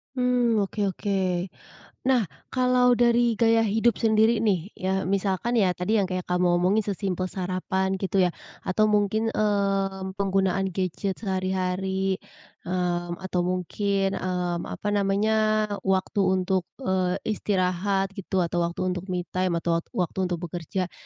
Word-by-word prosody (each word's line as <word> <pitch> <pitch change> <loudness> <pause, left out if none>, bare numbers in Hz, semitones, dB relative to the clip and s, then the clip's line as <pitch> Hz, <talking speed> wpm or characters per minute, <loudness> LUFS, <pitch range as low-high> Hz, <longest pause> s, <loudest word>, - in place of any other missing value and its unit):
Mmm, 245 -4 +2
oke 200 +2 -6 0.2
oke. 205 - -3 0.9
Nah, 260 -2 +4 0.3
kalau 250 -1 +4
dari 240 0 +3
gaya 225 -1 +4
hidup 225 +2 +2
sendiri 220 +1 +4
nih 190 -3 +1
ya, 190 0 -1
misalkan 200 +4 0
ya 190 -5 +3
tadi 180 +5 0
yang 200 - +3
kayak 185 -1 -4
kamu 180 0 +1 0.2
omongin 200 +4 +2
sesimpel 190 -2 -2
sarapan, 190 +1 -1
gitu 195 0 0
ya, 180 - +4 0.3
atau 215 +4 +1
mungkin, 215 +1 +1
mmm, 195 -2 0
penggunaan 195 0 +1
gadget 185 +1 -2
sehari-hari, 190 -1 -1 0.5
mmm, 175 -1 -1
atau 185 -1 -1
mungkin, 195 +2 -1
mmm, 180 -2 -2
apa 205 - -4
namanya, 200 +2 +1 0.5
waktu 190 +1 0
untuk, 185 -1 +1 0.2
eee, 185 -2 +1 0.2
istirahat, 195 0 0
gitu, 190 -2 -1
atau 175 +1 -1
waktu 180 +2 -4
untuk 185 +1 -3
me 180 -1 -2
time 185 -2 0
atau 170 -1 +2
wat - - -23
waktu 180 +1 -1
untuk 175 0 -3
bekerja. 175 +2 -4
190 Hz, 140 wpm, -25 LUFS, 185-210 Hz, 0.9 s, Nah